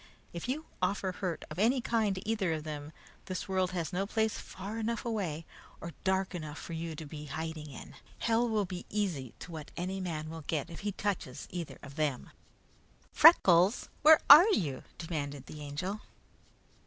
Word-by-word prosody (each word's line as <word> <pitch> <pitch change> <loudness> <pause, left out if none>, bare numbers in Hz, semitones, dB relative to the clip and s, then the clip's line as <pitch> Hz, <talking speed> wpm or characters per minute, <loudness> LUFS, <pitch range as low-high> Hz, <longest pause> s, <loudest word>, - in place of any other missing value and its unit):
If 170 +7 -5
you 305 +5 -2 0.2
offer 190 +1 0
hurt 180 -2 -4
of 155 - -6
any 240 +6 +4
kind 225 -4 +1
to 190 +3 -7
either 205 -7 +1
of 155 -1 -3
them, 150 -1 -6 0.3
this 185 +1 -4
world 185 -1 +1
has 175 0 -3
no 195 +2 0
place 220 0 +1
far 200 +4 -6
enough 230 +2 -2
away 180 -9 -2 0.3
or 170 -1 -7
dark 190 0 +1
enough 155 -3 -6
for 170 - -7
you 165 0 -4
to 155 - -7
be 150 0 -8
hiding 155 +1 -5
in. 135 - -10 0.2
Hell 235 +1 +2
will 215 -2 +1
be 180 -1 -7
easy 175 - -2
to 175 - -10
what 155 -2 -7
any 185 +2 -2
man 155 -3 -4
will 160 -1 -7
get 160 +1 -2
if 165 - -8
he 205 - -2
touches 190 -10 -3
either 175 -3 -5
of 140 +1 -11
them!" 150 -5 -1 0.8
"Freckles, 195 - +6
where 310 +1 +8
are 315 +9 +11
you?" 150 - 0 0.2
demanded 145 -5 -4
the 150 - -9
Angel. 165 +9 -4
180 Hz, 180 wpm, -31 LUFS, 155-205 Hz, 0.8 s, are